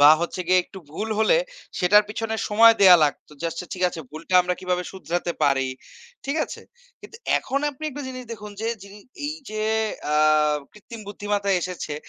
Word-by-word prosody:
বা 145 +1 +9
হচ্ছে 170 +2 -3
গিয়ে 185 -1 +5
একটু 190 - -12
ভুল 210 +8 -4
হলে, 220 - +4 0.4
সেটার 205 +4 +5
পেছনে 225 +1 -3
সময় 225 +2 +7
দেয়া 185 -3 +9
লাগতো। 145 - -3
যে - - -5
আচ্ছা 165 +2 -6
ঠিক 185 - -6
আছে 170 - -7
ভুলটা 165 +4 -6
আমরা 180 0 -1
কিভাবে 180 -1 -1
শুধরাতে 175 -2 -3
পারি? 135 -2 +2 0.6
ঠিক 280 +2 -2
আছে? - - -9 0.4
কিন্তু - - -12 0.2
এখন 270 +1 -2
আপনি 290 +3 -10
একটা 290 +1 -7
জিনিস 255 -1 -7
দেখুন 210 -2 -8
যে, 225 - -2 0.2
যিনি 200 +1 -12 0.3
এইযে 275 -9 -5 0.5
আ - - +2 0.6
কৃত্রিম 220 +2 -11
বুদ্ধিমত্তা 205 -1 -2
এসেছে। 175 -4 -4
200 Hz, 175 wpm, -24 LUFS, 180-225 Hz, 0.6 s, বা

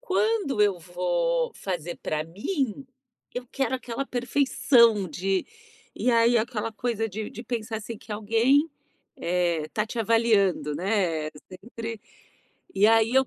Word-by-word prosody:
Quando 430 - 0
eu 200 -4 +3
vou - - 0
fazer 175 -3 -4
pra 155 0 -1
mim, 255 - -3 0.5
eu 245 0 -4
quero 270 -1 -1
aquela 250 +1 -4
perfeição 245 -5 +3
de 190 +4 -1 0.5
e 250 - +1
aí 235 0 +4
aquela 225 -1 -1
coisa 225 0 -2
de 215 +1 -5
de 230 - -8
pensar, 225 -1 -3
assim, 220 +1 -6
que 215 - -17
alguém, 230 +9 +3 0.5
eh, 170 -3 0
tá 215 0 0
te 235 - -6
avaliando, 215 -8 +2
né, 175 -4 0 0.2
sempre 225 +3 -7 0.7
E 200 +2 +5
aí 225 0 +4
eu 265 0 +5
225 Hz, 135 wpm, -26 LUFS, 195-250 Hz, 0.7 s, E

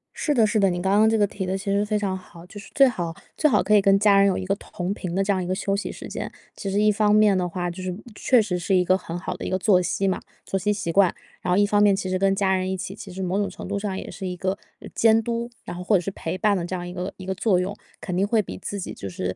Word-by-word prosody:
是 295 - 0
的 235 -5 +4
是 215 +1 +1
的， 195 -1 +4
你 175 0 -2
刚 190 +2 +1
刚 220 - +5
这 225 - +2
个 205 - +4
提 195 -1 -5
得 190 +1 -1
其 195 - -9
实 200 +1 +2
非 210 0 0
常 195 -2 -1
好， 175 -2 -14
就 205 +3 -11
是 200 - -12
最 275 -1 +6
好 170 -9 -3 0.2
最 305 - +4
好 210 - +3
可 215 - +3
以 205 - +6
跟 195 0 +5
家 205 -1 +5
人 200 - +5
有 190 - +1
一 185 - -4
个 195 - +1
同 190 -2 -5
频 180 -4 -5
的 195 - +2
这 200 - +1
样 190 -2 0
一 175 - -5
个 185 - 0
休 195 +1 -1
息 200 - -3
时 - - -9
间。 - - -5 0.3
其 200 - -5
实 200 +2 +1
一 215 0 +5
方 210 0 +2
面 210 -3 +5
的 180 -1 0
话， 175 +1 -3
就 175 +2 -7
是 185 -1 -3 0.2
确 250 +1 +4
实 200 -4 -2
是 190 +3 +1
一 180 - +4
个 185 +1 +3
很 170 -2 -6
好 175 - -4
的 - - -7
一 - - -2
个 185 - +1
作 185 -1 +4
息 190 +2 -1
嘛 190 - 0 0.3
作 195 - -1
息 210 +2 +1
习 170 -4 -3
惯， 190 0 +4 0.3
然 - - -2
后 180 - +3
一 205 - +5
方 205 0 +2
面， 205 -1 +5
其 190 -1 -3
实 185 - 0
跟 195 0 +3
家 190 -1 +2
人 185 0 -1
一 190 - -1
起， 190 +1 -6
其 200 -2 -10
实 190 - -6
某 185 +2 -1
种 200 -2 0
程 190 - -9
度 200 +1 -2
上 200 -2 -3
也 - - -6
是 190 - -6
一 180 - -4
个， 190 +2 -2 0.2
呃， - - -10
监 225 0 +4
督， 235 +1 -2
然 - - -7
后 180 - -6
或 205 +3 +3
者 180 - +3
是 195 +3 -4
陪 180 -1 -4
伴 205 +1 +2
的 170 - -3
这 185 - -4
样 175 -1 -5
一 175 - -7
个 180 +1 -4
一 185 - -9
个 190 - -1
作 190 -2 +2
用。 190 +3 -2 0.3
肯 180 - -4
定 190 +2 +2
会 220 0 +3
比 - - -8
自 200 +1 -5
己 185 - -5
就 100 - -7
是 90 0 -4
195 Hz, 365 characters per minute, -24 LUFS, 180-205 Hz, 0.3 s, 最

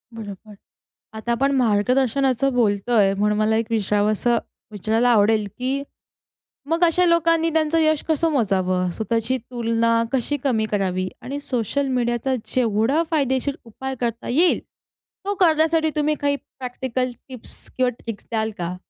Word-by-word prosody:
बरोबर. 210 -1 -9 0.6
आता 220 +2 -4
आपण 275 +4 +1
मार्गदर्शनाचं 255 +3 +2
बोलतोय 210 -3 +2
म्हणून 210 +1 +1
मला 215 +1 +2
एक 225 +1 +1
विचारावसं 215 +2 +1 0.3
विचारायला 220 +4 +1
आवडेल 215 -1 +3
की 265 +2 -2 0.9
मग 330 +2 +1
अशा 350 +2 +3
लोकांनी 330 -1 +3
त्यांचं 320 0 +2
यश 310 -1 +2
कसं 320 +1 +1
मोजावं? 185 -8 +1
स्वतःची 230 +4 -1
तुलना 230 -1 0
कशी 270 +2 0
कमी 230 -6 +1
करावी? 185 -2 0
आणि 280 +2 -5
सोशल 275 +1 -1
मीडियाचा 245 +1 0
जेवढा 235 +4 +1
फायदेशीर 275 -2 0
उपाय 265 +4 -6
करता 235 0 -3
येईल, 325 +9 +3 0.7
तो 405 - 0
करण्यासाठी 320 -2 +3
तुम्ही 300 0 +1
काही 285 0 +2
प्रॅक्टिकल 255 -1 -4 0.2
टिप्स 255 -3 -12
किंवा 255 -1 +3
ट्रिक्स 230 -3 -7
द्याल 220 -1 0
का? 175 +1 -3
245 Hz, 135 wpm, -22 LUFS, 220-280 Hz, 0.9 s, आवडेल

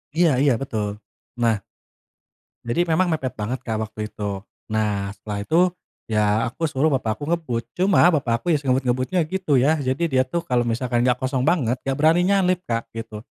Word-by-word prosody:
Iya 170 0 +4
iya, 140 -2 +4
betul. 105 -6 -3 0.4
Nah, 115 -3 +1 1.0
jadi 120 +9 0
memang 175 +2 +2
mepet 145 -7 -2
banget 110 +5 -3
Kak 110 -2 -2
waktu 110 0 -16
itu. 100 -1 -4 0.2
Nah 105 -2 -1
setelah 105 +1 -5
itu, 160 +11 +2 0.5
ya 105 0 +1
aku 160 +7 -2
suruh 145 +3 +1
Bapak 110 -5 -1
aku - - -9
ngebut. 125 -9 -2
Cuma 185 -1 +4
Bapak 125 -6 +1
aku, 175 -2 +1
ya - - +4
sengebut-ngebutnya 130 +5 +1
gitu 160 -4 0
ya. 150 +5 +3
Jadi 130 +5 -1
dia 130 - +4
tuh 170 +5 -3
kalau 125 -6 +1
misalkan 120 +1 0
nggak 125 0 +2
kosong 130 0 -1
banget, 130 -5 +1
nggak 135 0 -2
beraninya 175 +6 +4
nyalip 180 0 +2
Kak, 115 0 -2
gitu. 115 -1 -7
130 Hz, 180 wpm, -22 LUFS, 110-160 Hz, 1.0 s, Iya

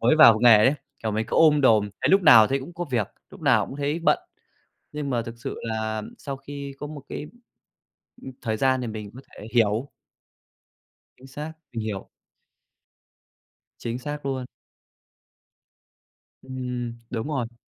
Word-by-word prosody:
mới 125 +7 +4
vào 115 -8 +8
nghề 120 -3 +8
ấy, 130 +7 +4 0.3
kiểu, 110 - -1
mình 110 +1 -1
cứ - - -2
ôm 150 -2 +6
đồm, 110 -5 +4
thấy - - +3
lúc 195 0 +5
nào 115 -8 +8
thấy 135 +4 0
cũng 165 +6 -10
có 175 - -3
việc, 115 -5 0 0.2
lúc - - -13
nào - - +3
cũng 135 - -8
thấy 145 +2 -1
bận. 170 - +3 0.7
Nhưng 150 -2 -4
mà 120 -2 0
thực 115 0 -8
sự - - -5
là 110 -1 -2 0.2
sau 140 -2 -5
khi 140 0 -8
có 145 - -5
một 145 -2 -9
cái, - - -6 1.0
ưm, 130 - -8
thời 110 -1 -1
gian 130 +2 +2
thì 125 - -3
mình 105 -2 -6
có 130 - -9
thể 105 - -11
hiểu. 115 +3 +2 1.3
Chính 130 - -15
xác, 150 +4 -7 0.2
mình 115 - -3
hiểu. 105 -3 -5 1.7
Chính 120 +1 -4
xác 145 +2 -6
luôn. 130 -2 -2 2.0
Ừm, 125 -2 -4 0.2
đúng 115 -1 -3
rồi. 120 -5 -3
125 Hz, 165 wpm, -25 LUFS, 110-140 Hz, 2.0 s, vào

